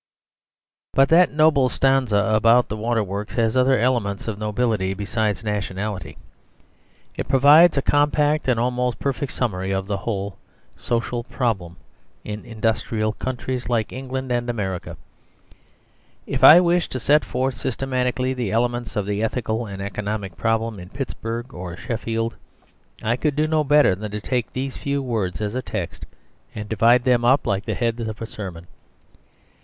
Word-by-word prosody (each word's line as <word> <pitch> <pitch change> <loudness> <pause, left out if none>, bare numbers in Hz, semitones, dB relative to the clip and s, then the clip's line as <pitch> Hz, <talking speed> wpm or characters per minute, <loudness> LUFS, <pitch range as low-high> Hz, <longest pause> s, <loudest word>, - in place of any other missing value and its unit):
But 135 0 +4
that 175 +2 +5
noble 150 -4 +4
stanza 125 -7 +2
about 115 +3 +4
the 105 - -3
water 115 +1 0
works 100 +2 -5
has 115 -1 +1
other 130 +1 +4
elements 115 -5 0
of 105 -2 -4
nobility 105 -3 0
besides 105 0 -2
nationality. 105 -1 -4 1.0
It - - -4
provides 145 +5 +6
a 140 - +1
compact 145 +1 +2
and 125 -3 +2
almost 125 0 0
perfect 140 0 -2
summary 95 -6 -2
of 95 0 -1
the 100 0 -2
whole 100 -1 -4 0.4
social 120 0 -2
problem 110 -9 -2 0.5
in 105 0 -6
industrial 110 -1 -1
countries 130 0 -4
like 115 -3 0
England 130 0 -5
and 120 0 -1
America. 95 -6 -4 1.3
If 130 -1 -3
I 155 +6 +11
wished 175 -1 +1
to 130 - -2
set 145 +5 +3
forth 130 +1 -1
systematically 130 0 -1
the 120 -6 -3
elements 120 +1 -1
of 105 - -1
the 100 +1 -2
ethical 115 0 -2
and 100 -1 -6
economic 100 -2 -4
problem 115 +1 -1
in 90 0 -10
Pittsburg 120 -1 -5
or 90 -1 -7
Sheffield, 115 0 -3 0.7
I 115 +2 +1
could 150 +1 -1
not 155 +1 +1
do 155 -1 +3
better 145 -8 +5
than 105 +3 -5
take 125 +1 -2
these 135 +1 -4
few 140 -1 -2
words 110 -6 -2
as 105 0 -2
a 130 - -2
text, 100 -8 -5 0.5
and 105 -1 -5
divide 115 +3 +4
them 125 -2 +3
up 130 +4 +3
like 100 -2 -1
the - - -2
heads 115 -1 -1
of 110 -1 -6
a 115 - -4
sermon. 95 -6 -8
115 Hz, 155 wpm, -22 LUFS, 105-130 Hz, 1.3 s, I